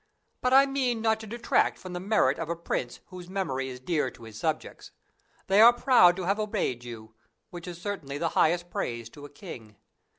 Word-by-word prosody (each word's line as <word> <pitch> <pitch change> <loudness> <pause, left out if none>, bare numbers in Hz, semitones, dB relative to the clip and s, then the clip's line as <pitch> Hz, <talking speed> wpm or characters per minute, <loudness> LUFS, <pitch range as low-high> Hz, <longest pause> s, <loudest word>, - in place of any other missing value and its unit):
But 250 - +1
I 270 +1 +7
mean 265 -4 -1
not 220 0 +1
to 220 - -9
detract 235 +2 +1
from 185 -1 -9
the 180 - -3
merit 185 -9 +2
of 165 -1 -4
a 170 - -1
prince 145 -7 -4
whose 180 -1 -10
memory 135 -9 -2
is 125 -1 -8
dear 150 +4 -1
to - - -16
his 110 -1 -11
subjects. 110 - -4 0.6
They 195 +2 +4
are 235 +2 +10
proud 240 -8 +5
of 185 - -4
having 205 +3 0
obeyed 185 - -2
you, 110 -2 -10 0.4
which 175 0 -9
is 175 -1 -7
certainly 175 -8 -5
the 165 +2 -1
highest 175 +2 +1
praise 115 -1 -4
to 145 -1 -11
a - - -10
king. 120 - -11
175 Hz, 205 wpm, -27 LUFS, 135-210 Hz, 0.6 s, are